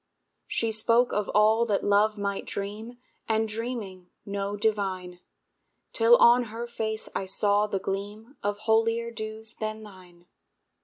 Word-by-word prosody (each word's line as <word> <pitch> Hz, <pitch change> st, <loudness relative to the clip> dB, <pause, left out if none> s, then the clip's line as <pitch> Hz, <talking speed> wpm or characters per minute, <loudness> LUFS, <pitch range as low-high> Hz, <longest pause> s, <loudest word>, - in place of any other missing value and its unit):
She 225 Hz, -1 st, 0 dB
spoke 230 Hz, +3 st, +3 dB
of 210 Hz, -1 st, -1 dB
all 215 Hz, +2 st, +5 dB
that 205 Hz, -3 st, 0 dB
Love 210 Hz, +1 st, +3 dB
might 200 Hz, -1 st, -3 dB
dream, 215 Hz, +4 st, -6 dB, 0.3 s
And 220 Hz, 0 st, +2 dB
dreaming, 210 Hz, -5 st, -5 dB, 0.2 s
know 200 Hz, 0 st, -3 dB
divine; 190 Hz, -4 st, -1 dB, 0.7 s
Till 230 Hz, +1 st, +6 dB
on 240 Hz, +1 st, +6 dB
her 230 Hz, +2 st, -6 dB
face 220 Hz, -2 st, -4 dB
I 190 Hz, -, -3 dB
saw 205 Hz, +2 st, +2 dB
the 200 Hz, -, -2 dB
gleam 205 Hz, +6 st, -5 dB
Of 205 Hz, 0 st, -1 dB
holier 230 Hz, +1 st, +1 dB
dews 220 Hz, 0 st, -6 dB
than 215 Hz, 0 st, -4 dB
thine. 180 Hz, -4 st, -15 dB
215 Hz, 140 wpm, -27 LUFS, 200-225 Hz, 0.7 s, Till